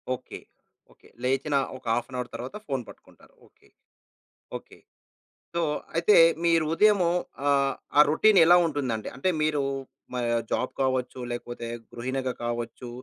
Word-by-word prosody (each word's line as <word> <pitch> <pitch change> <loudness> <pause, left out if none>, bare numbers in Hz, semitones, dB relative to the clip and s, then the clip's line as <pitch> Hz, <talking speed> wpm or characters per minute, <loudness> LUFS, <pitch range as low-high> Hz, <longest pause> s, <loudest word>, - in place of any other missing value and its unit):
Okay. - - -10 0.5
Okay. - - -22
లేచిన 135 +3 0 0.2
ఒక 130 - -20
half 120 - -2
an 130 - -5
hour 125 - -4
తర్వాత 125 +8 -7
ఫోన్ 135 -3 -1
పట్టుకుంటారు. - - -17
ఓకే. - - -28 0.9
ఓకే. - - -12 0.8
సో, 170 - +1 0.3
అయితే, 170 +5 +4 0.3
మీరు 165 -2 +3
ఉదయమూ 200 -1 +4 0.4
ఆహ్, 140 -1 +3 0.2
ఆ - - +10
రొటీన్ 200 +6 +5
ఎలా 175 - +7
ఉంటుందండి? 130 -8 -2
అంటే, 135 +8 0
మీరూ 150 -2 +1 0.5
మా 125 - -2 0.3
జాబ్ 125 - -1
కావచ్చు, 130 -1 -1
లేకపోతే 120 -1 -6 0.2
గృహిణిగా 130 +2 -3
కావచ్చు. 120 +1 -4
135 Hz, 135 wpm, -26 LUFS, 125-160 Hz, 0.9 s, ఆ